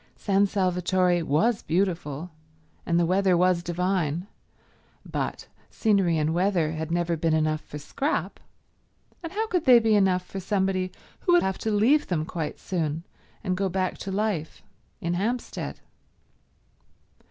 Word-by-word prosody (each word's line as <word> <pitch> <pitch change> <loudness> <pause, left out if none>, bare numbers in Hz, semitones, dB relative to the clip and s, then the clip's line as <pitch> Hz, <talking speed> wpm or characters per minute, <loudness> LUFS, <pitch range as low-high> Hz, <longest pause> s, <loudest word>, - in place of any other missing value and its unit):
San 200 0 +2
Salvatore 180 -2 +1
was 165 - +2
beautiful, 170 -3 -1 0.6
and 170 0 +2
the 170 - +3
weather 185 +1 +3
was 180 0 +3
divine; 175 -1 -1 0.8
but - - -4 0.2
scenery 195 -7 +2
and 155 +1 +1
weather 175 -3 +1
had 160 0 -4
never 170 0 0
been 160 0 +1
enough 155 0 +1
for 150 - -9
Scrap, 270 - -2 0.8
and 330 -2 -6
how 435 +3 -1
could 360 -6 -1
they 250 -3 +8
be 225 -1 +3
enough 190 -3 +3
for 195 - -6
somebody 190 -1 0 0.3
who 355 - +2
would 350 - +5
have 190 0 -1
to 220 - -2
leave 235 +9 +3
them 160 -4 -1
quite 160 -2 -4
soon 165 -3 -2 0.4
and 185 -3 0
go 195 +1 0
back 185 0 -1
to 195 - -5
life 195 -6 -2 0.4
in 170 +1 -1
Hampstead? 225 +8 -3
185 Hz, 145 wpm, -26 LUFS, 165-200 Hz, 0.8 s, they